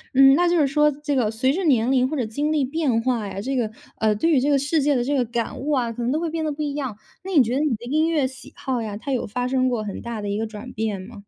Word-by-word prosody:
嗯， 270 0 +8
那 350 +3 +3
就 350 - +2
是 295 -4 +4
说 300 +2 +3
这 290 0 -3
个 235 -5 +2
随 260 +5 +1
着 380 - -2
年 250 -4 +3
龄 255 -1 +3
或 305 - -3
者 245 - 0
经 285 +8 -2
历 295 -4 +2
变 275 -5 0
化 240 -5 0
呀， 195 0 -6
这 265 +6 -2
个 225 -4 0 0.3
呃， 215 -1 +3
对 330 +10 +1
于 275 - +5
这 285 - +1
个 285 - +4
世 290 +3 +1
界 285 0 +2
的 240 - +1
这 285 +3 0
个 255 - +2
感 235 +3 -3
悟 295 +3 -2
啊， 245 -4 +1
可 240 - -6
能 240 +2 0
都 305 - +1
会 335 0 -2
变 325 -1 -2
得 310 - -1
不 295 +1 -5
一 290 -1 -2
样。 265 -7 -4 0.3
那 385 - -6
你 290 -8 +6
觉 235 +2 -2
得 270 - +1
你 290 -6 +1
的 230 +2 -10
音 310 +6 +1
乐 300 -5 +2
喜 260 0 -12
好 255 -3 -2
呀， 210 -2 -4
它 275 +6 -5
有 250 - -1
发 245 +4 -2
生 255 0 +2
过 235 -4 -1
很 205 - -6
大 235 -2 -5
的 205 - -4
一 200 - -1
个 225 - -1
转 220 +4 -9
变 215 -3 -2
吗？ 200 +1 -11
260 Hz, 350 characters per minute, -23 LUFS, 230-290 Hz, 0.3 s, 嗯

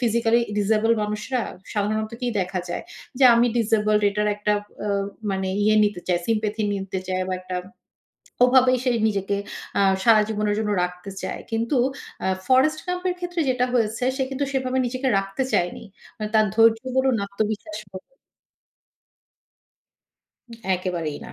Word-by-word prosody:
Physically 235 -1 +2 0.2
disable 215 +2 +2
মানুষরা 210 +5 -2 0.3
সাধারণত 215 +1 -1
কি 245 - -2
দেখা 185 0 -2
যায়? 175 - -3 0.4
যে 270 - +5
আমি 235 +1 +4
ডিজেবলড 215 -2 +2
এটার 210 +1 0
একটা 210 0 0 0.3
আ - - -1 0.4
মানে 190 0 -1
ইয়ে 215 +1 +4
নিতে 205 -3 -1
চায়, 180 -1 +2
মানে 170 - -10
sympathy 215 -1 0
নিতে 195 -1 -3
চাই, 185 0 -1
বা - - -1
একটা 185 0 -5 0.9
ওভাবেই 255 0 +5
সে 255 - +2 0.2
নিজেকে 200 -1 -1 0.4
আ - - +4 0.2
সারা 225 -2 +6
জীবনের 210 -1 0
জন্য 215 - -1
রাখতে 180 +2 -5
চায়। - - -4
কিন্তু 230 +4 0 0.5
আ - - +1 0.2
Forest 270 +4 +4
Gump 360 0 -3
এর 355 - -2
ক্ষেত্রে 355 -1 -2
যেটা 250 -1 +2
হয়েছে 225 -1 0
সে 265 - +1
কিন্তু 270 +1 -2
সেভাবে 260 -1 0
নিজেকে 255 +2 -2
রাখতে 195 +6 -2
চায়নি। 175 +6 0 0.4
আ - - -1
তার 215 -1 +5
ধৈর্য 225 0 +5 0.2
বলুন 260 -2 +3
আত্মবিশ্বাস 210 +1 -3
বলু 190 +8 -11 2.6
একেবারেই 175 -5 -3
না। - - -10
215 Hz, 150 wpm, -23 LUFS, 200-245 Hz, 2.6 s, সারা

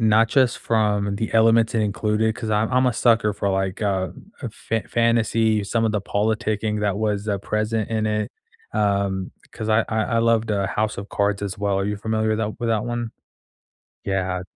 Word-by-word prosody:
not 110 0 +4
just 130 -1 +2
from 105 -3 0
the 110 - -3
elements 115 0 +4
in 115 - +2
included, 105 +1 0
'cause 110 -1 -5
I'm 105 +1 +1
I'm 130 +1 +3
a 125 - +2
sucker 115 -3 +3
for, 100 - -2
like, 95 0 -1
uh, 95 -3 0 0.3
a - - -3
fa 115 -1 -3
fantasy, 115 -2 +2
some 115 +3 0
of 110 - +1
the 105 - 0
politicking 105 +1 -1
that 100 -1 0
was, 105 -1 -1
uh, 100 - 0
present 110 +2 -1
in 110 -1 0
it, 105 -1 -1 0.4
um, 100 -2 0 0.2
'cause 110 - -5
I 110 +1 +3
I 110 -1 0
I 115 -2 0
loved 115 -1 +2
the 100 -2 0
House 110 +1 -1
of 100 +1 -6
Cards 100 0 0
as 100 -2 -3
well, 100 -1 0
are 95 - 0
you 105 +1 -2
familiar 110 +1 -1
with 110 - 0
that 110 -1 -3
with 120 - -1
that 110 -1 +1
one? 120 -1 -3 0.9
Yeah. 95 -2 -1
110 Hz, 200 wpm, -22 LUFS, 100-115 Hz, 0.9 s, not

